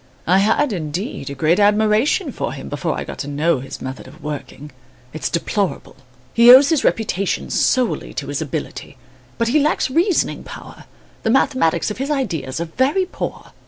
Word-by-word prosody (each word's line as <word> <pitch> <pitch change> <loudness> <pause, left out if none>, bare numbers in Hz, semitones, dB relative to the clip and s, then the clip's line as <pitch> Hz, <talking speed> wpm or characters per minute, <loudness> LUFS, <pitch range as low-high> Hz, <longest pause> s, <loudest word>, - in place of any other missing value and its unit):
I 185 +3 +4
had, 225 +6 +2
indeed, 165 - -4
a 140 - -6
great 155 +7 +2
admiration 210 +5 +2
for - - -4
him, - - -8
before - - -2
I - - -3
got - - -9
to 145 - -4
know 145 +1 +1
his 135 +1 -8
method 130 0 -7
of 135 +4 -15
working. 150 0 -7 0.4
It's 150 -4 -3
deplorable. 185 0 -2 0.4
He 235 +1 +6
owes 270 +3 +8
his 320 -4 +2
reputation 200 -3 -1
solely 255 -3 +1
to - - -3
his - - -3
ability; - - -6 0.4
but 230 0 0
he 300 +5 +3
lacks 295 -2 +1
reasoning 340 +5 +1
power, - - -11 0.4
the - - -1
mathematics 220 - +2
of 210 - -7
his 270 +2 -2
ideas 165 - -2
are 170 - -2
very 265 - +1
poor." 365 - -6
205 Hz, 175 wpm, -20 LUFS, 155-260 Hz, 0.4 s, owes